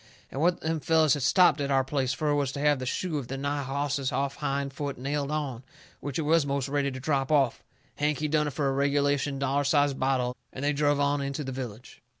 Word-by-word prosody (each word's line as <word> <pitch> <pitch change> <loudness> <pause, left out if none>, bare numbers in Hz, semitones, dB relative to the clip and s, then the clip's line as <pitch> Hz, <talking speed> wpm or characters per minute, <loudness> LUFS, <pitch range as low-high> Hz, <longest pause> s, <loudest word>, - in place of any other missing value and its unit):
And 135 - -4
what 175 +2 +2
them 160 0 -1
fellers 155 0 +3
had 145 - -1
stopped 155 +1 +4
at 140 - -1
our 135 -1 +3
place 130 -1 -1
fur 150 +2 0
was 140 -2 0
to 140 - -5
have 145 -1 +3
the 130 - -4
shoe 160 +2 -1
of 130 - -7
the 135 - -4
nigh 140 +1 -2
hoss's 140 0 -2
off 140 0 -1
hind 140 0 -2
foot 140 -1 -4
nailed 140 +2 -2
on, 145 -6 -3 0.4
which 145 -2 -4
it 160 - 0
was 160 +1 +3
most 140 -1 -1
ready 140 0 0
to 130 -1 -6
drop 135 0 0
off. 135 -5 +2 0.4
Hank, 150 0 +1
he 155 - -1
done 150 0 +1
it 145 - -4
fur 140 +1 0
a - - 0
regulation, 140 0 +1
dollar 140 +1 0
size 145 0 +3
bottle 130 -2 0 0.2
and 135 - -5
they 145 - +2
druv 145 0 +2
on 145 0 +1
into 140 +2 -3
the 135 - -5
village. 125 -3 -8
140 Hz, 240 wpm, -28 LUFS, 135-145 Hz, 0.4 s, stopped